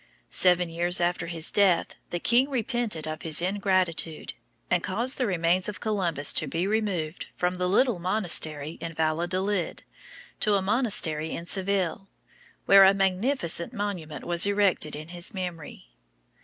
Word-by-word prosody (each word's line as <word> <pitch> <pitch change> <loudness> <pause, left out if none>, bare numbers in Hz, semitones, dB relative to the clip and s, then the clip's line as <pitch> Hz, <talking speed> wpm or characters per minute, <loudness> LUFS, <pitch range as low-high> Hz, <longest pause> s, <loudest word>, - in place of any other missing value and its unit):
Seven 180 -1 +3
years 175 +2 +1
after 175 -1 -1
his 165 -2 -1
death 190 -4 +2 0.2
the 175 - -3
king 245 +8 +3
repented 240 - -2
of 155 0 -6
his 155 -2 0
ingratitude, 185 -4 -1 0.3
and 180 - +1
caused 235 +11 -3
the 250 - +1
remains 180 +1 +1
of 210 - -7
Columbus 175 - +2
to - - 0
be 170 +2 -2
removed 195 -7 -2
from 180 0 -1
the 180 0 -2
little 210 +2 +2
monastery 165 -5 0
in 165 -1 -6
Valladolid 175 +4 -1 0.6
to 210 -1 +3
a - - +2
monastery 190 -8 +2
in 170 - -6
Seville, 195 0 -1 0.6
where 195 0 +7
a 195 +1 +6
magnificent 195 - +1
monument 180 - -5
was 175 +2 +4
erected 200 -6 +1
to 150 - -5
his 175 +4 -6
memory. 170 - -7
180 Hz, 145 wpm, -26 LUFS, 165-200 Hz, 0.6 s, where